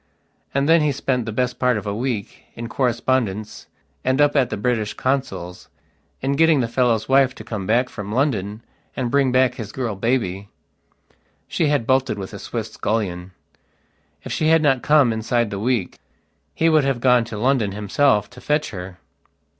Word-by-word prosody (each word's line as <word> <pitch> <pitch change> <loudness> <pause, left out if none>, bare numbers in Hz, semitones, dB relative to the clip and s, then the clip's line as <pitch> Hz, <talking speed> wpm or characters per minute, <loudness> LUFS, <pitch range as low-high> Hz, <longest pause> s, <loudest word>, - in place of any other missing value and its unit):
And 140 +1 0
then 165 0 +5
he 150 -1 +2
spent 130 -4 -1
the - - -2
best 125 +3 -1
part 125 -3 +2
of 105 - -6
a 100 - -2
week, 115 -2 -4
in 115 0 -6
correspondence 115 -4 -1 0.4
and 130 +2 +1
up 145 0 +4
at 135 -4 +3
the - - -3
British 110 -1 -1
consul's, 130 -10 -3 0.5
in 135 - 0
getting 160 +1 +4
the 120 - 0
fellow's 115 -2 +1
wife 135 -1 +3
to - - -10
come 105 -4 -5
back 120 +4 +2
from 105 -4 -7
London 110 -5 -1 0.3
and 125 -3 -2
bring 140 -1 +3
back 130 -1 +3
his 115 -5 -7
girl 120 -5 -3
baby. 100 -3 -1 1.0
She 160 - 0
had 145 -5 +1
bolted 130 -2 +1
with 95 0 -7
a 100 - -7
Swiss 110 0 -5
scullion. 95 -4 -2 0.9
If - - -7
she 155 - 0
had 160 0 +4
not 135 -4 +3
come 145 -6 +4
inside 115 0 0
the 100 - -4
week 115 -4 -1 0.6
he 165 - +2
would 155 -2 +4
have 135 -3 0
gone 125 -1 +4
to 115 -2 -7
London 120 -3 +1
himself 105 +1 +2
to 125 0 -13
fetch 150 +1 0
her. 90 -1 -8
125 Hz, 180 wpm, -21 LUFS, 105-135 Hz, 1.0 s, then